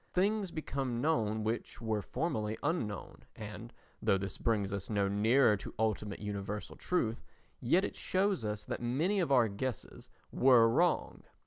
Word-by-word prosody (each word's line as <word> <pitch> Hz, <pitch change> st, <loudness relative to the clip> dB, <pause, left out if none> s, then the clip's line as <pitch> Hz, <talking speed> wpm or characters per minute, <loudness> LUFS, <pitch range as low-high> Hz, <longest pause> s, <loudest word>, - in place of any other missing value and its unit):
Things 200 Hz, +1 st, +2 dB
become 135 Hz, -7 st, -3 dB
known 110 Hz, -7 st, +1 dB
which 110 Hz, +2 st, -3 dB
were 110 Hz, -2 st, -1 dB
formerly 110 Hz, -7 st, -2 dB
unknown 120 Hz, -, -3 dB
and, 110 Hz, +2 st, -8 dB, 0.3 s
though 100 Hz, -, +3 dB
this 95 Hz, 0 st, -5 dB
brings 105 Hz, -4 st, 0 dB
us 100 Hz, -1 st, -4 dB
no 100 Hz, -2 st, +1 dB
nearer 110 Hz, +4 st, +4 dB
to -, -, -9 dB
ultimate 105 Hz, -2 st, -1 dB
universal 105 Hz, 0 st, -5 dB
truth, 120 Hz, -11 st, -1 dB, 0.4 s
yet 175 Hz, +11 st, +3 dB
it -, -, -5 dB
shows 190 Hz, -, 0 dB
us 105 Hz, -1 st, -3 dB
that -, -, -4 dB
many 155 Hz, +12 st, +1 dB
of 170 Hz, -6 st, 0 dB
our 125 Hz, -4 st, +5 dB
guesses 110 Hz, +4 st, -5 dB, 0.2 s
were 125 Hz, -3 st, +6 dB
wrong. 170 Hz, +10 st, +1 dB
115 Hz, 150 wpm, -33 LUFS, 105-145 Hz, 0.4 s, were